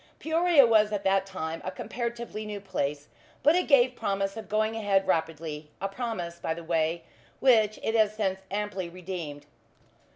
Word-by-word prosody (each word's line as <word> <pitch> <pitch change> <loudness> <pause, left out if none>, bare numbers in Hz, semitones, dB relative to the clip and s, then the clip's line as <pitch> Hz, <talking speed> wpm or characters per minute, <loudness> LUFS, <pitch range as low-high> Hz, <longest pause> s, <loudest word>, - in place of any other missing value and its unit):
Peoria 320 -2 +4
was 215 -2 +4
at 205 -1 -2
that 195 0 +2
time 165 -4 -4
a - - -3
comparatively 235 +2 -5
new 210 -1 -5
place, 145 -7 -3 0.4
but 305 +3 +6
it 360 - +1
gave 255 -3 +5
promise 195 -2 -1
of 220 -2 -8
going 215 +1 +1
ahead 200 -3 +2
rapidly; 160 -2 -2
a 195 - -1
promise, 195 -6 -4
by 160 - -2
the 170 - -8
way, 165 0 0 0.4
which 220 -5 +4
it 220 - 0
has 215 -2 +3
since 190 -3 -1
amply 195 -3 -3
redeemed. 170 -5 -6
195 Hz, 165 wpm, -28 LUFS, 170-225 Hz, 0.4 s, but